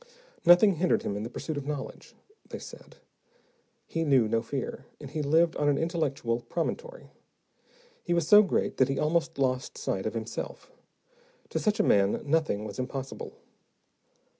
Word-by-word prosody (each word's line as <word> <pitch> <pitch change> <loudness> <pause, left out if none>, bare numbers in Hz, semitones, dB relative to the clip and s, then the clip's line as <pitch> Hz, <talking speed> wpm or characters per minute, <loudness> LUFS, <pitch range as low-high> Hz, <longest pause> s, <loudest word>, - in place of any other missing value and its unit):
Nothing 175 +1 +7
hindered 180 +3 +2
him 100 - -2
in 105 - -3
the 115 - -5
pursuit 155 +4 -5
of 145 -1 -5
knowledge, 145 -3 -6 0.3
they - - -5
said. - - -12 0.9
He 165 - -2
knew 135 -7 +4
no 115 +1 +1
fear, 130 +3 -5
and 140 -2 -9
he 155 0 -2
lived 160 +3 +3
on 145 - +2
an 145 - +2
intellectual 145 -8 -1
promontory. 475 - -4 0.9
He 175 - 0
was 170 -2 0
so 210 +3 +9
great 200 - -1
that 130 0 +3
he 135 - -1
almost 165 +1 0
lost 130 -2 -1
sight - - -2
of - - -4
himself. - - -6 0.8
To - - -2
such 215 0 0
a - - +4
man, 100 - +3
nothing 145 -9 0
was 105 +3 -7
impossible. 135 +1 -5
145 Hz, 165 wpm, -28 LUFS, 130-170 Hz, 0.9 s, so